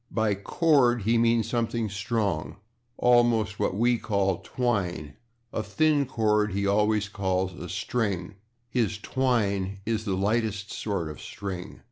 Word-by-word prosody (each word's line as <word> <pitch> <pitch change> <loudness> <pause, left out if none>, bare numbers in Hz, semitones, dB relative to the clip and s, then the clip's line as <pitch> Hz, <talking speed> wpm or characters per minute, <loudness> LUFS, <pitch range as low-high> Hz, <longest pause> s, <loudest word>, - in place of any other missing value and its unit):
By 110 -2 +1
/cord/ 125 - +2
he 115 +3 +3
means 115 -1 +3
something 115 -1 -1
strong, 100 -4 -2 0.4
almost 120 -4 +3
what - - 0
we 120 +2 +2
call 100 -4 0
/twine/; 90 - -2 0.4
a - - -1
thin 150 +2 +2
cord 105 -4 +1
he 100 +1 0
always 105 +1 +2
calls 95 -2 -1
a - - -8
/string/; 100 -6 -2 0.3
his 115 -3 0
/twine/ 105 -6 0
is 110 -1 -1
the 100 -4 -1
lightest 105 0 0
sort 100 -6 -2
of 75 -2 -7
/string 95 -1 -7
105 Hz, 135 wpm, -27 LUFS, 100-120 Hz, 0.4 s, he